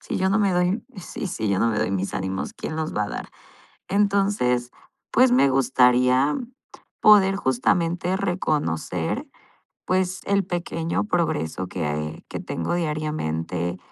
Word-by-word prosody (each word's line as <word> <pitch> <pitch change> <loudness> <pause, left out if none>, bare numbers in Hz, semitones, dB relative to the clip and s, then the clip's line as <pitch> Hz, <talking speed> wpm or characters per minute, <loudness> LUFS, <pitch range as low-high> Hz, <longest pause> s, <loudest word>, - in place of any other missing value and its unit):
Si - - -4
yo 190 - +2
no 195 +3 +2
me 200 -3 +2
doy 180 +5 +1
si 190 +4 -6
si 110 - -3
yo 100 - +1
no 115 - +3
me 110 - -1
doy - - 0
mis 95 0 -2
ánimos, 95 0 -3
¿quién 155 - -6
los 160 0 -3
va 105 - +1
a - - -6
dar? - - -6 0.6
Entonces, 195 -12 +1 0.4
pues 255 +1 +4
me 245 - +5
gustaría 130 +1 +3 0.6
poder 195 -2 +6
justamente 170 +5 +1
reconocer, 150 - -1 0.6
pues 185 0 0
el 200 0 +2
pequeño 170 -2 -2
progreso 155 - -1
que, 85 -4 -4
ah, 75 - -1
eh, 75 +1 -5
que - - -5
tengo 85 - -3
diariamente, 95 - -2
155 Hz, 150 wpm, -24 LUFS, -, 0.6 s, poder